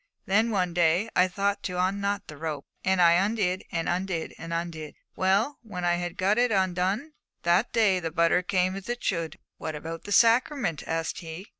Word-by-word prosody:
Then, 220 +4 +2
one 185 -5 0
day, 175 +5 +2
I 180 - +5
thought 200 +2 -1
to 180 -1 -4
unknot 200 +2 0
the 150 - -10
rope, 150 -2 -5 0.2
and 190 0 +2
I 170 -1 +7
undid, 195 -3 0
and 165 -1 -2
undid, 180 -2 -2
and 165 - -7
undid. 165 -3 -4 0.2
Well, 200 +9 +1
when 190 -6 -5
I 175 0 +2
had 175 +1 -4
got 205 +4 +2
it 245 -1 +3
undone, 190 - 0 0.3
that 175 +6 +2
day 205 -5 +3
the 165 -2 -3
butter 170 +2 +3
came 185 0 0
as 195 +3 -8
it 240 0 -3
should!' 165 -4 -1
'But - - -29 0.2
what 155 -1 -5
about 165 +2 -7
the 205 - -7
sacrament?' 235 - +3
asked 165 0 -2
he. 165 +3 -8
185 Hz, 195 wpm, -27 LUFS, 170-200 Hz, 0.3 s, I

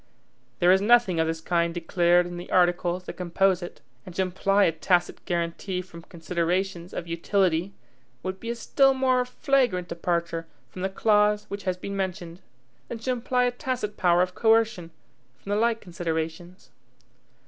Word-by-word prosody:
There 175 +1 +4
is 190 +1 +4
nothing 215 -5 +4
of 160 - +2
this 160 0 -3
kind 170 0 0
declared 175 +1 +2
in 175 0 -7
the 175 - -8
articles 175 0 +2
that - - -7
compose 185 +1 +1
it; 175 - -9 0.2
and 180 - -11
to 190 - +1
imply 195 +2 +2
a 170 - +4
tacit 175 +2 0
guaranty 175 +2 -2
from 170 -2 -12
considerations 175 +2 -2
of - - -5
utility, 175 +1 0 0.5
would 185 0 -4
be 230 - -6
a 235 - -2
still 270 +3 +3
more 260 -1 +2
flagrant 250 - 0
departure 170 -1 -2 0.2
from 185 - -8
the 190 - 0
clause 210 +1 +2
which 200 0 -6
has 185 -1 -1
been 200 +2 -6
mentioned, 185 -2 -4 0.5
than 235 - -5
to 230 +3 -2
imply 250 0 0
a 245 - +2
tacit 245 -4 -4
power 175 -2 +3
of 185 0 -4
coercion 220 -6 +2 0.5
from 200 - -8
the - - +2
like 230 +1 +1
considerations. 170 0 -5
185 Hz, 170 wpm, -26 LUFS, 175-210 Hz, 0.5 s, There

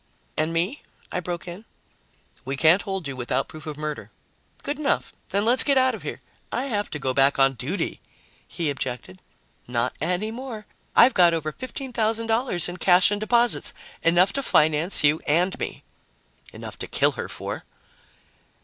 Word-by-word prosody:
"And 155 +1 0
me?" 175 - -1 0.3
I - - -1
broke 175 0 -5
in. 175 +5 -8 0.8
"We 135 +1 -4
can't 165 +6 +5
hold 195 -5 -4
you 135 - -5
without 125 +1 -1
proof 155 -1 -11
of 150 -2 -5
murder." 150 -1 -5 0.5
"Good 290 +1 -3
enough. 290 -2 0 0.2
Then 200 +2 +1
let's 245 +3 +5
get 280 -2 +3
out 260 0 +4
of - - -7
here." - - -6 0.3
"I 250 - -1
have 210 -7 -2
to - - -4
go 135 -2 -1
back 135 +1 +4
on 135 0 +5
duty," 140 - -3 0.5
he 165 -4 -2
objected. 125 -8 -5 0.5
"Not 125 +1 -1
any 180 +7 -1
more. 230 -3 -7 0.3
I've 245 +3 +7
got 175 -3 +5
over 155 -1 -2
$15,000 230 -5 -1
in 175 0 -6
cash 180 +2 +5
and 205 0 -1
deposits 235 +1 +2 0.3
enough 175 +3 +4
to 275 - -1
finance 160 - +2
you 150 +2 +4
and 175 +5 +2
me." - - -5 0.7
"Enough - - -9
to - - -4
kill - - +2
her - - -6
for." - - -6
175 Hz, 165 wpm, -24 LUFS, 150-225 Hz, 0.8 s, I've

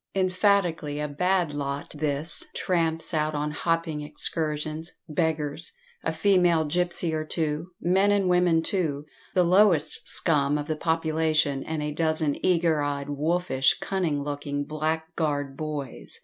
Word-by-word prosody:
Emphatically 185 -5 +1
a 150 - -1
"bad 175 +2 0
lot" 140 -1 -4
this, 150 +1 -1
tramps 165 -2 +1
out 155 -1 0
on 150 +1 -1
hopping 165 -1 -1
excursions, 155 +1 -2
beggars, 155 - -2 0.3
a - - 0
female 175 -5 +3
gipsy 175 +1 -1
or 155 0 -1
two 155 0 -2
men 190 +3 +3
and 200 -2 +2
women, 180 -2 +3
too, 155 -7 -1 0.3
the 180 - +5
lowest 175 -4 +3
scum 145 -3 +3
of 145 - -3
the 155 - -2
population, 160 -3 +1
and 155 -1 -3
a 150 0 -3
dozen 155 -2 0
eager 165 -4 +2
eyed, 145 0 -2
wolfish, 150 -2 +1
cunning 165 -7 -1
looking 145 0 -3
blackguard 155 -2 -2
boys. 140 - -6
155 Hz, 135 wpm, -26 LUFS, 150-175 Hz, 0.3 s, the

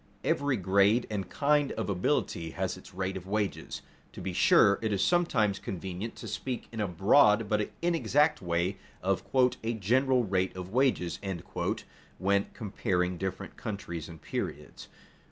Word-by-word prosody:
_ - - -32 0.2
Every 140 -2 +1
grade 100 +5 +3
and 100 -4 -3
kind 145 -1 +2
of 110 - -3
ability 90 -3 0
has - - -1
its - - -13
rate 95 +1 -3
of 95 -1 -7
wages. 105 0 -2 0.3
To - - -9
be - - -4
sure, 100 0 +5
it 110 -1 -1
is 100 -2 +1
sometimes 110 - +2
convenient 95 +4 -5
to - - -8
speak 130 -2 -4
in 115 - -6
a 105 - 0
broad 105 - +4
but 105 0 0
inexact 155 -3 +2
way 85 +2 0 0.3
of 95 0 +1 0.4
"a 115 +1 0
general 125 +5 +2
rate 95 -3 0
of 90 0 -6
wages," 125 -8 +1 1.0
when 100 +1 +2
comparing 90 -4 -1
different 95 -1 -5
countries 85 -6 -5
and 80 -1 -10
periods. - - -5
100 Hz, 155 wpm, -29 LUFS, 95-120 Hz, 1.0 s, sure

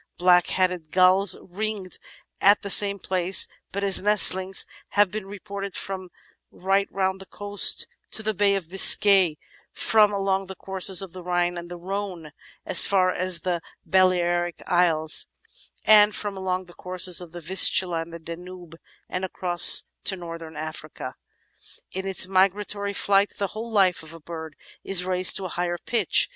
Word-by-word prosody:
Black 180 0 +3
headed 180 -4 -3
Gulls 185 +1 +3
ringed 200 0 -6 0.4
at 205 +2 +3
the 200 - -4
same 200 0 +4
place, 185 0 +1 0.2
but 200 +1 -5
as 195 -2 +3
nestlings, 190 -2 +2 0.3
have 205 -3 +3
been 210 -1 -7
re 205 +1 -10
ported 200 -1 -8
from 190 -2 -6 0.4
right 195 +2 -2
round 190 0 -3
the 190 - -14
coasts 205 0 +1 0.2
to 220 - -2
the 215 0 -2
Bay 200 0 +1
of 190 -5 -5
Biscay, 190 -2 +5 0.3
from 215 -2 +2
along 195 -1 -2
the 190 - -10
courses 190 0 0
of 190 - -11
the 185 - -10
Rhine 175 0 -2
and 175 0 -9
the 175 - -9
Rhone, 190 -1 -6
and 150 - -14 0.3
as 180 - +6
far 185 -2 +1
as 180 -1 0
the 175 -2 -3 0.2
Balearic 175 -2 0
Isles, 160 -3 0 0.6
and 210 -1 +5
from 205 -1 -5
along 185 -1 -4
the 175 - -18
courses 180 0 -1
of 175 -2 -12
the 175 - -10
Vistula 175 0 +4
and 165 +1 -10
the 170 - -9
Danube 170 0 -11 0.3
and 180 - -6
across 180 -1 +4
to 195 - 0
Northern 165 -3 -10
Africa. 155 -4 -8 0.8
In 190 +1 -6
its 190 -1 +5
migratory 200 +2 -1
flight 200 0 0
the 200 -2 -3
whole 225 +2 -8
life 195 -5 +1
of 160 +1 -13
a - - -13
bird 160 -1 -10 0.3
is 185 -2 +3
raised 185 0 +3
to 195 - -5
a - - -6
higher 175 0 -4
pitch. 235 +6 +1
185 Hz, 170 wpm, -23 LUFS, 175-195 Hz, 0.8 s, as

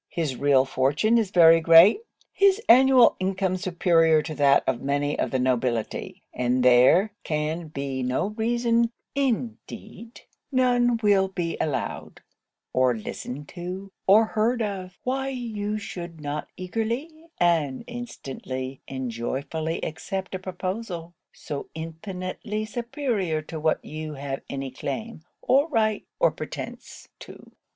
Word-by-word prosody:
His 155 -6 -2
real 135 -1 +3
fortune 145 - +2
is 215 -4 -1
very 165 -3 +6
great; 165 - +7 0.3
his 395 0 +4
annual 255 +1 +7
income 190 0 0
superior 170 -4 +3
to 155 - -5
that 140 -2 +4
of 130 -2 -1
many 145 +1 -1
of - - 0
the 130 - 0
nobility; 125 -3 -1
and 125 +1 0
there 130 - +5
can 155 +2 -2
be 140 -3 -4
no 130 +10 0
reason, 235 +1 +1 0.2
indeed 235 -3 -4 0.3
none 245 -2 +3
will 200 -2 +4
be 175 -3 -3
allowed, 150 -4 -3 0.5
or 130 -2 +2
listened 130 +6 -7
to, 185 +3 -7 0.2
or 210 +4 +7
heard 225 +2 0
of, 185 -3 -5
why 265 +1 -1
you 215 -5 -3
should 170 -5 -7
not 150 0 -4
eagerly, 235 - -4
and 160 -6 +1
instantly, 135 - -6
and 130 -2 -4
joyfully 140 +7 -3
accept 190 +4 -5
a 190 - -3
proposal 185 -1 -5 0.2
so 145 -2 -7
infinitely 185 +6 -5
superior 235 - -2
to 160 +1 -7
what 155 0 0
you 155 0 -6
have 135 0 -5
any 135 -1 -4
claim, 225 - -5 0.2
or 275 +5 +3
right, 220 -7 0
or - - +4
pretence - - -8
to.' - - -13
180 Hz, 130 wpm, -25 LUFS, 145-225 Hz, 0.5 s, great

